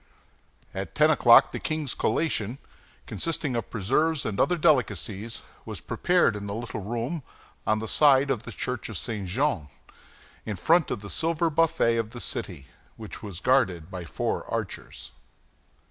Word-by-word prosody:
At - - -5
ten - - +5
o'clock, - - +7
the - - -4
king's 155 -4 -2
collation, 125 -7 0 0.5
consisting 145 - -2
of 115 - -3
preserves 150 +10 +1
and 105 -2 -3
other 175 - +3
delicacies, 115 - 0 0.2
was - - -6
prepared 175 -11 +2
in 100 -1 -5
the 100 - -4
little 115 0 -5
room 120 - -3 0.5
on 110 - +3
the 110 +1 -4
side 140 0 +5
of 120 -6 -1
the 115 - -8
church 125 +1 -4
of 110 - -4
St. 105 -5 -3
Jean, 115 - 0 0.8
in 110 - -4
front 165 - +3
of - - -3
the 100 - -7
silver 165 0 0
buffet 155 -7 +2
of 115 -1 -2
the 120 - -6
city, 85 - -4 0.3
which 110 -2 -9
was 100 -5 -7
guarded 95 -9 +2
by 90 -2 -5
four 85 - -2
archers. - - -5
115 Hz, 160 wpm, -27 LUFS, 100-150 Hz, 0.8 s, o'clock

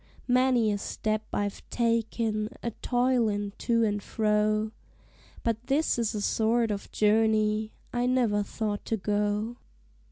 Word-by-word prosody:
Many 250 -3 +3
a 205 - -1
step 215 +1 -2
I've 205 -1 -2
taken 225 -2 0
a 235 - -1
toilin' 235 -5 +1
to 230 -1 +2
and 205 -2 0
fro, 215 0 +1 0.7
But 230 +1 -1
this 280 -2 +2
is 230 -1 0
a 210 - -2
sort 225 +2 +2
of 200 -1 -5
journey 215 0 +2 0.2
I 245 0 +1
never 240 -5 +2
thought 205 0 -3
to 225 - -1
go. 210 +3 -1
220 Hz, 130 wpm, -28 LUFS, 210-235 Hz, 0.7 s, Many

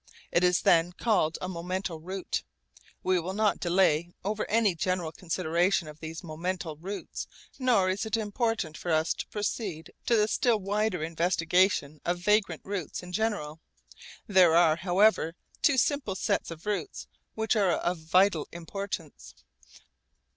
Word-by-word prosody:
It 170 - +3
is 180 -1 +3
then 170 +1 +4
called 180 -6 +1
a 185 - -3
'momental 180 -1 -4
route.' 185 +3 -3 0.6
We 185 -1 +2
will 185 +3 -4
not 215 -1 +2
delay 175 -2 +2
over 210 +2 -2
any 220 -3 +3
general 175 -1 -1
consideration 170 +1 0
of 150 0 -11
these 160 +2 -7
momental 170 0 -4
routes, 195 +4 -6 0.3
nor 240 -8 +3
is 185 +2 0
it 220 0 -1
important 220 -5 -1
for 175 - -3
us 160 +1 +2
to - - -6
proceed 205 -5 -4
to 235 - +4
the 210 -1 +3
still 230 +1 +2
wider 200 -3 -1
investigation 165 -1 +1
of 175 +1 0
vagrant 195 -2 +1
routes 190 -4 -4
in 180 - -9
general. 185 -8 -1 0.7
There 185 -5 +5
are 165 -2 +5
however 185 -1 +3 0.3
two 285 - +4
simple 260 -6 +1
sets - - -1
of 165 +1 -9
routes 210 - -3 0.3
which 220 +1 +1
are 195 -5 +3
of 175 +1 -1
vital 170 0 +3
importance. 170 -2 -6
185 Hz, 145 wpm, -28 LUFS, 165-205 Hz, 0.7 s, There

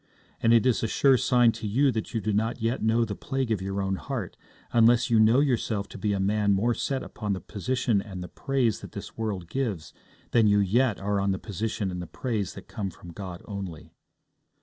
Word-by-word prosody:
And 115 - +4
it 115 0 +5
is 125 -3 +3
a 115 - 0
sure 135 +4 +4
sign 120 -1 +4
to 110 - -6
you 135 +7 +3
that 110 -3 -3
you 115 - -2
do 105 0 -1
not 110 +4 0
yet 115 +3 -1
know 115 +1 +3
the 105 - -4
plague 130 +3 -3
of 105 -4 0
your 95 +1 -2
own 95 0 -1
heart, 120 -9 -5 0.4
unless 120 +1 +4
you 115 - +5
know 115 +5 +5
yourself 115 -7 0
to - - -9
be 105 +2 0
a 100 - 0
man 100 +1 +2
more 115 +5 +2
set 135 +2 -2
upon 105 -2 -3
the 95 - -3
position 115 0 -1
and 95 -3 -7
the - - -6
praise 125 +2 0
that - - -10
this 100 - -8
world 105 -6 -3
gives 110 -9 -3 0.4
than 115 -3 +4
you 105 0 +4
yet 110 +3 +2
are 100 0 0
on 100 0 +1
the - - -2
position 105 0 -3
and 90 0 -4
the 90 - -7
praise 110 -5 -3
that - - -10
come 100 -2 -4
from 90 -1 -12
God 90 -2 -7
only. 95 -6 -7
110 Hz, 225 wpm, -27 LUFS, 100-120 Hz, 0.4 s, it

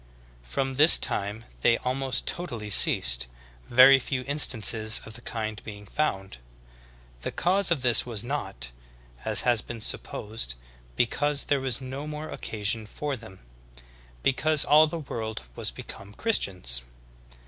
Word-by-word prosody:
From 65 - -4
this 155 +3 +9
time 105 +3 -1 0.2
they 115 - +3
almost 130 0 -2
totally 115 - -4
ceased, - - +5 0.4
very 130 +2 +6
few 130 0 -4
instances 115 -6 +2
of 110 - -8
the 120 - -7
kind 110 -2 -5
being 105 -2 -10
found. 95 - -3 0.8
The - - -4
cause 190 +2 +1
of 160 -6 0
this 120 -2 +5
was 115 -3 -4
not, 100 - -4 0.5
as - - +3
has 120 -3 +1
been 120 - -8
supposed, 105 - -1 0.4
because 145 +4 0
there 140 -2 -1
was 130 -1 0
no 135 +3 -7
more 150 +1 -7
occasion 110 0 -4
for 145 +5 -5
them, 110 -6 -11 0.8
because 155 +3 +2
all 155 +2 +5
the 170 - -6
world 110 - -6
was - - 0
become 100 +11 -9
Christians. 90 - -1
120 Hz, 135 wpm, -25 LUFS, 105-140 Hz, 0.8 s, this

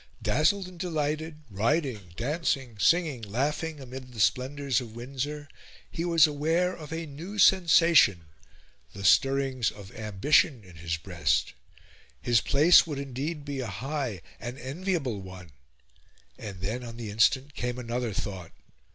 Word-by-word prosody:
Dazzled 180 +7 +2
and 180 -2 -13
delighted, 155 -2 -3
riding, 115 - -1
dancing, 135 -4 -2
singing, 160 - +2
laughing, 145 +8 -2
amid 130 -1 -9
the 115 - -9
splendours 130 +2 +1
of 115 -2 -10
Windsor, 140 +4 -5 0.4
he 165 - -3
was 170 -3 +5
aware 160 +5 0
of 155 -1 -10
a 165 0 -3
new 165 +8 -8
sensation 165 - +5 0.7
the 100 - -8
stirrings 135 -1 +3
of 100 -2 -12
ambition 110 - +2
in 90 -3 -15
his 85 +1 -3
breast. 80 - 0 0.7
His 120 -2 +2
place 155 +5 +6
would 150 -3 -4
indeed 140 +3 -4
be 140 -2 -4
a 125 - -3
high, 125 - -4 0.2
an 120 +2 -6
enviable 135 - -3
one! 95 -3 -11 0.8
And 100 -4 -8
then, 110 +6 -3
on 115 -1 -8
the 115 -3 -6
instant, 130 +6 +2
came 125 -1 -3
another 120 -1 -3
thought. 95 -4 -5
135 Hz, 140 wpm, -28 LUFS, 110-155 Hz, 0.8 s, place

